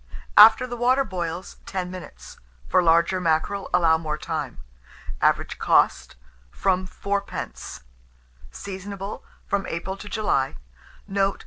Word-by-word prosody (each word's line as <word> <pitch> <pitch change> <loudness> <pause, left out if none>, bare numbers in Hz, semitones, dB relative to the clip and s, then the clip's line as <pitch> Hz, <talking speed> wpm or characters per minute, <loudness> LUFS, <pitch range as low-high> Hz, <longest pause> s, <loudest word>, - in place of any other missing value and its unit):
After 225 +3 +9
the 245 -1 -6
water 250 +3 +3
boils, 180 -4 -5
10 180 -2 -3
minutes; 185 -4 -11 0.3
for - - +3
large 170 +1 +4
mackerel, 180 +2 0
allow 165 -2 +4
more 155 -2 -3
time. - - -4 0.6
Average - - +1
cost, - - +2 0.3
from 185 - 0
4d. 200 - -5 0.7
Seasonable 195 - -7 0.2
from 200 -1 -1
April 170 +3 -4
to 205 +1 -9
July. 205 -12 0 0.5
Note. 195 0 0
190 Hz, 115 wpm, -24 LUFS, 170-200 Hz, 0.7 s, After